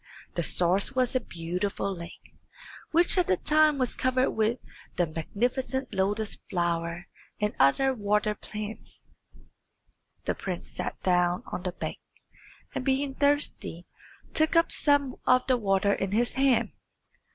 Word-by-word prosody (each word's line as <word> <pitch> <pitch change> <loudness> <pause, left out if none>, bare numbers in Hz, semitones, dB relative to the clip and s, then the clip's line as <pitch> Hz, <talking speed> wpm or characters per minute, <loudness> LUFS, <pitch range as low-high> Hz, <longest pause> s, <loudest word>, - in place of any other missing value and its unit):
The 170 - -1
source 180 +7 +3
was 255 -1 +1
a - - +4
beautiful 185 +2 -3
lake, 170 -1 -11 0.6
which 345 +3 +4
at 360 - +2
that 185 - 0
time 305 -1 +4
was 255 -2 +1
covered 255 0 +1
with 220 +2 +1 0.4
the 175 - +2
magnificent 245 - -2
lotus 205 +2 -1
flower 170 0 -1 0.3
and 210 0 0
other 265 - +4
water 210 -2 +1
plants. 210 +1 -8 1.2
The - - +1
prince - - -5
sat - - -4
down 180 -1 +2
on - - -3
the 180 0 -3
bank, - - -5 0.7
and - - -3
being 270 +1 0
thirsty 285 - 0 0.5
took 315 +1 +1
up 330 0 +4
some 285 -3 +1
of 255 0 +4
the 260 - +3
water 200 -2 +2
in 195 0 -2
his 235 +3 +1
hand. 265 -1 +2
215 Hz, 140 wpm, -27 LUFS, 180-265 Hz, 1.2 s, a